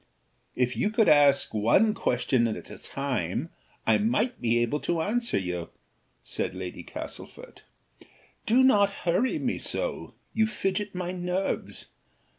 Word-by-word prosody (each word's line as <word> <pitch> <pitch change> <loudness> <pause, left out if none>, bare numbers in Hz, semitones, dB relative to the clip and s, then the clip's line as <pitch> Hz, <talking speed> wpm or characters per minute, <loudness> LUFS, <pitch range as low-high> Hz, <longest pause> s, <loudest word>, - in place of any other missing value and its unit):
"If 125 0 0
you 210 - 0
would 220 - +5
ask 145 -2 +5
one 120 - +3
question 125 - +1
at 110 - -6
a - - -10
time, 135 - -3 0.4
I - - +4
might 225 +3 0
be 120 -1 +2
able 120 +5 +1
to 170 +2 -1
answer 235 +8 0
you," 90 -3 -3 0.5
said 90 - -2
Lady 90 -1 -6
Castlefort. - - -9 0.9
"Do 245 +4 +5
not 205 -6 +5 0.2
hurry 185 +9 +2
me - - -2
so; - - -3 0.2
you 220 0 +3
fidget 205 -1 -2
my 180 0 -3
nerves. 180 +1 -3
175 Hz, 135 wpm, -27 LUFS, -, 0.9 s, would